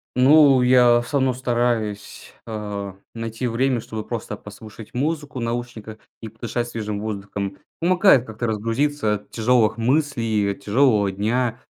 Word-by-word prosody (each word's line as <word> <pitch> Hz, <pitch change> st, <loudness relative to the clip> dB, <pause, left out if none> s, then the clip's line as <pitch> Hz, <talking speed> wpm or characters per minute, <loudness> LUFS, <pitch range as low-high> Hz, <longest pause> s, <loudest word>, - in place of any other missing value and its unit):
Ну, 135 Hz, 0 st, +6 dB
я 125 Hz, -1 st, +5 dB
всё 140 Hz, +4 st, -2 dB
равно 130 Hz, -1 st, +2 dB
стараюсь, 120 Hz, -4 st, -2 dB
а, 105 Hz, -3 st, -5 dB, 0.2 s
найти 115 Hz, +1 st, -5 dB
время, 125 Hz, +2 st, 0 dB
чтобы 110 Hz, -1 st, -6 dB
просто 110 Hz, -3 st, -5 dB
послушать 105 Hz, +1 st, -12 dB
музыку 145 Hz, +1 st, -2 dB
наушниках 115 Hz, -2 st, -5 dB, 0.2 s
и 110 Hz, -, -7 dB
подышать 120 Hz, +2 st, -4 dB
свежим 105 Hz, -3 st, -4 dB
воздухом. 100 Hz, -2 st, -5 dB, 0.2 s
Помогает 175 Hz, -, +4 dB
как-то 110 Hz, +1 st, -4 dB
разгрузиться 115 Hz, +2 st, 0 dB
от 105 Hz, -, -10 dB
тяжелых 115 Hz, -1 st, +2 dB
мыслей, 115 Hz, -3 st, 0 dB
и -, -, +1 dB
от 100 Hz, -, -8 dB
тяжелого 105 Hz, -3 st, +2 dB
дня, 115 Hz, +5 st, -1 dB
115 Hz, 140 wpm, -22 LUFS, 105-125 Hz, 0.2 s, Ну